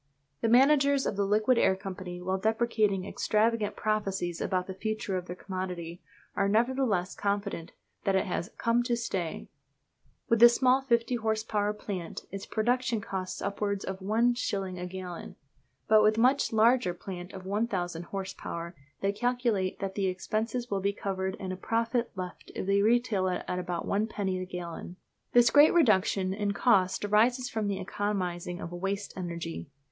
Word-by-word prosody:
The 225 - +2
managers 275 +2 +5
of - - -1
the 200 0 0
Liquid 215 +4 +3
Air 190 - +4
Company, 185 -2 -7
while 190 +1 -1
deprecating 220 -3 +1
extravagant 215 +1 +1
prophecies 195 -5 -1
about 185 -1 0
the 190 - -6
future 215 0 -3
of 180 -1 -3
their 180 - -5
commodity, 180 -3 -5 0.3
are 200 -1 +2
nevertheless 225 -4 +1
confident 200 -4 -2 0.3
that 195 - +2
it 190 - +2
has 175 -2 -3
"come 230 +1 +2
to 240 -1 0
stay." 185 -8 -3 0.8
With 230 -3 +3
the 240 +1 +10
small 255 +2 +3
50 240 -1 +1
horse 220 -1 -1
power 210 -2 0
plant 195 -5 -6
its 195 0 -6
production 240 +1 +1
costs 190 -2 -5
upwards 200 0 -2
of 190 0 -5
one 225 +5 +2
shilling 195 -6 -3
a 180 - -4
gallon, 180 -1 -7 0.5
but 215 0 +6
with 215 +1 +4
much 255 +4 +3
larger 225 -4 +3
plant 180 0 -7
of 190 -1 -9
1000 190 -5 -2
horse 195 0 -5
power 170 +1 -6 0.3
they 195 - +2
calculate 235 -4 0
that 195 -1 -2
the 195 -1 0
expenses 220 +6 -2
will 195 -1 0
be 200 +1 +1
covered 190 -1 -3
and 185 -1 -4
a - - -4
profit 230 +4 0
left 180 -2 -7
if - - -3
they 200 +1 +3
retail 220 -3 +2
it 180 -1 -1
at 180 0 -2
but 175 -1 -2
one 210 +2 0
penny 190 -4 -2
the 185 - -5
gallon. 175 -1 -6 0.4
This 240 -1 +6
great 295 +4 +7
reduction 195 - +3
in 205 0 -1
cost 200 -4 +2
arises 240 +5 +2
from 220 -2 -1
the 200 -1 -1
economising 180 -3 -3
of 170 - -6
"waste 195 +3 -3
energy." 170 -4 -5
200 Hz, 170 wpm, -29 LUFS, 185-230 Hz, 0.8 s, the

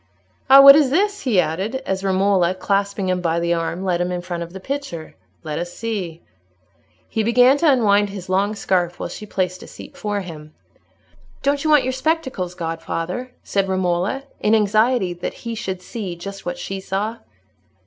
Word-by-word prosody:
Ah, 270 +1 +10
what 275 0 +11
is 295 -3 +4
this?" 405 +7 +1
he 230 -8 +2
added, 180 +8 -1
as 190 0 -2
Romola, 190 -2 +2
clasping 200 +1 -1
him 180 0 0
by 170 -1 0
the 170 0 +1
arm, 170 +2 -2
led 180 -2 0
him 180 0 -1
in 180 -1 -3
front 175 -1 -4
of 170 0 -6
the 190 - -8
picture. 230 - -5 0.3
"Let 150 0 -4
us 175 0 -4
see." 190 -7 -5 0.8
He 220 - -1
began 245 +4 +5
to 320 +1 +3
unwind 205 -5 +3
his 195 -2 -8
long 195 +3 +1
scarf 180 -3 0
while - - -4
she 210 - -8
placed 185 -2 -2
a - - -11
seat - - -12
for 205 -1 -2
him. 155 -4 -10 0.9
"Don't 280 0 +1
you 310 - 0
want 300 -3 +6
your 260 +1 -1
spectacles, 260 - -2
godfather?" 165 +7 -4
said 195 -1 0
Romola, 185 +7 0 0.2
in 215 +1 +3
anxiety 215 -1 +2
that 175 - -5
he 230 - -3
should 190 -4 -5
see 195 -4 -5
just 195 +2 -8
what 175 0 -3
she 195 +2 -5
saw. 205 +4 -3
195 Hz, 185 wpm, -21 LUFS, 175-230 Hz, 0.9 s, what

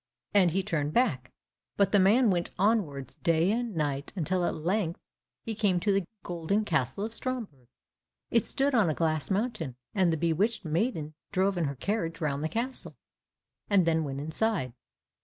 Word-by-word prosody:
And 195 -4 +6
he 190 +4 0
turned 150 -4 -1
back, 145 - +1 0.5
but 200 -1 +3
the 205 - +5
man 215 +4 +5
went 175 -1 0
onwards 175 - +1
day 165 +3 +3
and 235 -2 -2
night, 145 -2 -2
until 180 +1 0
at - - -1
length 170 +1 -1 0.5
he 225 - -2
came 205 -4 +2
to 205 +3 +1
the 195 -3 +1 0.2
golden 175 +5 -1
castle 160 - 0
of 225 - -5
Stromberg. 225 - -5 0.6
It 230 -3 +2
stood 275 +1 +1
on 215 -8 +4
a 155 - 0
glass 155 -3 0
mountain, 195 - -1 0.2
and 185 -4 +3
the 160 - 0
bewitched 175 +7 0
maiden 160 -2 -1 0.2
drove 195 +1 +2
in 175 -2 0
her 140 -1 -2
carriage 165 - -2
round 145 -3 -1
the 160 - 0
castle, 245 +6 -3 0.7
and 195 -4 +4
then 160 -1 +2
went 140 -2 -4
inside 160 - -1
it. - - -19
180 Hz, 175 wpm, -29 LUFS, 155-210 Hz, 0.7 s, And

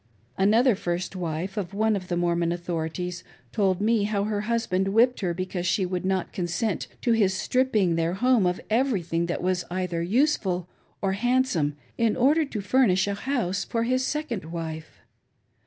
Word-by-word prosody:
Another 225 +6 +4
first 180 0 -3
wife 175 +3 -4
of 195 -1 -3
one 220 +1 +2
of 185 -2 -5
the 175 - -1
Mormon 170 -1 +1
authorities 175 0 -3 0.3
told 195 -4 +1
me 215 0 +2
how 205 -1 0
her 210 0 -1
husband 210 -4 0
whipped 235 +5 +3
her 180 -4 -1
because 180 0 -3
she 185 +2 +2
would 180 0 -3
not 190 -1 -1
consent 180 +3 -2 0.2
to 240 - +2
his 205 -4 +3
stripping 220 -6 +1
their 165 +2 0
home 240 -2 +3
of 180 - -1
everything 195 -9 0
that 175 - -3
was 185 -1 0
either 180 -2 -2
useful 190 - +1 0.4
or 195 - +2
handsome 210 - +1 0.2
in 230 -2 +2
order 290 +6 +4
to 220 -7 -5
furnish 200 -4 +3
a 200 - 0
house 200 -5 -1
for' 230 -1 -1
his 255 +2 +1
second 260 - -3
wife. 160 -1 -6
190 Hz, 170 wpm, -26 LUFS, 175-230 Hz, 0.4 s, Another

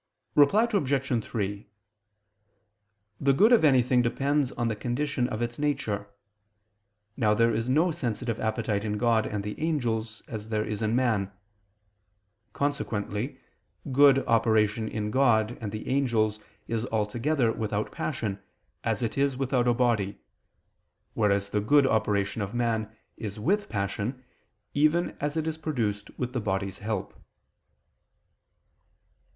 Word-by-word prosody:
Reply 195 +11 +5
Obj. 135 - +1
3: 100 -2 -4 1.5
The 140 0 +3
good 210 - +5
of 235 - +5
anything 125 -3 +4
depends 135 +3 +1
on 120 - -1
the 110 - -1
condition 125 +2 -1
of 110 +2 -2
its 120 +2 -4
nature. 105 -9 -1 1.1
Now 105 -5 +2
there 115 +1 +3
is 115 +2 -1
no 160 +7 +3
sensitive 120 -5 -3
appetite 110 -2 -1
in 105 -1 -2
God 115 -1 +2
and 105 -1 -3
the 105 +7 -6
angels, 115 -8 -1
as 110 -1 -6
there 110 -1 0
is 105 0 -4
in 110 +1 +1
man. 110 -6 +1 1.2
Consequently 120 -4 -2 0.5
good 135 0 +6
operation 110 -1 +2
in 105 -1 -3
God 120 -3 +3
and 105 -3 -4
the 110 +1 -6
angels 115 -6 +1 0.3
is 115 +1 -2
altogether 115 +4 0
without 105 -1 -2
passion, 110 -9 -3 0.4
as - - -1
it 115 +4 -2
is 140 -2 +1
without 130 -2 +1
a 120 - +4
body: 110 -5 +1 1.0
whereas 100 -2 +1
the 105 - +1
good 140 +6 +4
operation 105 -3 +1
of 100 +3 -4
man 115 -2 0 0.3
is 105 -1 -6
with 200 - 0
passion, 105 +5 -3 0.5
even 155 +4 +2
as 145 +2 -2
it 160 - 0
is 160 0 -3
produced 115 -10 -2
with 125 0 -3
the 125 - -1
body's 95 -2 -2
help. 105 -2 -3
115 Hz, 135 wpm, -27 LUFS, 105-135 Hz, 1.5 s, good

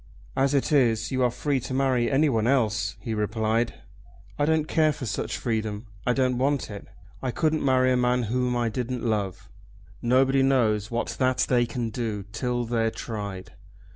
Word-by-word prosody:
"As 135 +1 +2
it 140 - +1
is 120 -6 +2
you 130 -1 0
are 125 - +4
free 140 +3 -1
to 130 +1 -5
marry 130 -3 +2
anyone 135 -6 +2
else," 110 -6 +1
he 115 -3 -3
replied. 110 +2 0 0.6
"I 145 - +3
don't 155 0 +1
care 155 -1 +3
for 140 -3 -6
such 105 -3 -3
freedom. 110 -2 -2 0.2
I 125 - +4
don't 125 -1 +1
want 140 -2 0
it. 100 - -8 0.3
I 130 - -2
couldn't 155 +3 0
marry 130 -1 +3
a 125 - +3
man 125 0 +2
whom 125 +2 0
I 120 -1 +1
didn't 125 +1 -3
love." 105 -5 -2 0.5
"Nobody 130 +3 +3
knows 115 -6 +2
what 120 0 -2
that 130 -1 +2
they 120 -2 +3
can 120 -2 -3
do 110 -4 -3
till 120 +2 -1
they're 115 -1 +1
tried." 100 -5 -6
125 Hz, 175 wpm, -26 LUFS, 110-130 Hz, 0.6 s, are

